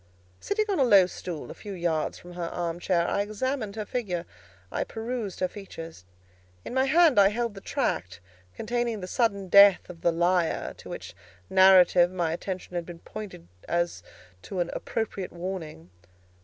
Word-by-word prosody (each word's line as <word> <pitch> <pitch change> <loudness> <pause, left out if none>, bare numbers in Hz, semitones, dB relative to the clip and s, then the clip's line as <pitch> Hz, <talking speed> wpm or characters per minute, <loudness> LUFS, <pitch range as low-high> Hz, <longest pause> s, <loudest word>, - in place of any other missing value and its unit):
Sitting 430 +1 0
on 395 -5 0
a - - +5
low 200 -7 +7
stool, 175 -3 -7
a - - -6
few 205 -2 -8
yards 170 -4 -1
from 175 0 -12
her 175 -1 -4
arm 170 -1 -3
chair, 175 -1 +1
I 200 - +1
examined 215 +1 -3
her 215 -1 -4
figure; 185 -8 -3 0.5
I - - -1
perused 225 -4 -5
her 185 - +3
features. 165 - -10 0.6
In - - -6
my 260 +1 +3
hand 310 -3 +5
I 195 - +7
held 230 +1 -2
the 195 - -10
tract 90 - -2 0.4
containing 235 -1 -2
the 180 - -5
sudden 200 -2 0
death 200 0 +7
of 170 - -15
the 170 - +3
Liar, 175 0 +1
to - - -12
which - - -8 0.4
narrative 185 -2 +6
my 175 -3 -1
attention 185 +1 -5
had 175 -1 -2
been 175 -1 -8
pointed 195 - -9 0.2
as 170 - -1 0.4
to 190 - -6
an 175 -1 -1
appropriate 205 -4 -3
warning. 170 - -6
185 Hz, 170 wpm, -27 LUFS, 175-215 Hz, 0.6 s, low